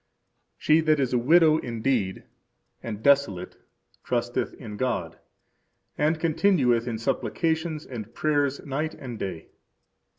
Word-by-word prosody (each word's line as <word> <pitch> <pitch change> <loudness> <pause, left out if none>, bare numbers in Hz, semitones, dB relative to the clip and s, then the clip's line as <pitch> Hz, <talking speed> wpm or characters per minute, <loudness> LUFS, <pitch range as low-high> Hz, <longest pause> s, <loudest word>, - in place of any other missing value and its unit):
She 155 +1 +4
that 155 -2 +2
is 130 -2 0
a 125 - +3
widow 155 +4 +5
indeed, 115 -4 -1 0.6
and 110 -1 -6
desolate, 140 -11 +2 0.5
trusteth - - -2
in 105 - -9
God, 95 -9 -2 0.8
and 155 +2 +1
continueth 155 -8 +2
in 115 -2 -2
supplications 160 +6 -1
and 115 -4 -7
prayers 145 0 0
night 150 +3 -3
and 120 -4 -8
day. 90 -5 -5
135 Hz, 120 wpm, -26 LUFS, 115-155 Hz, 0.8 s, widow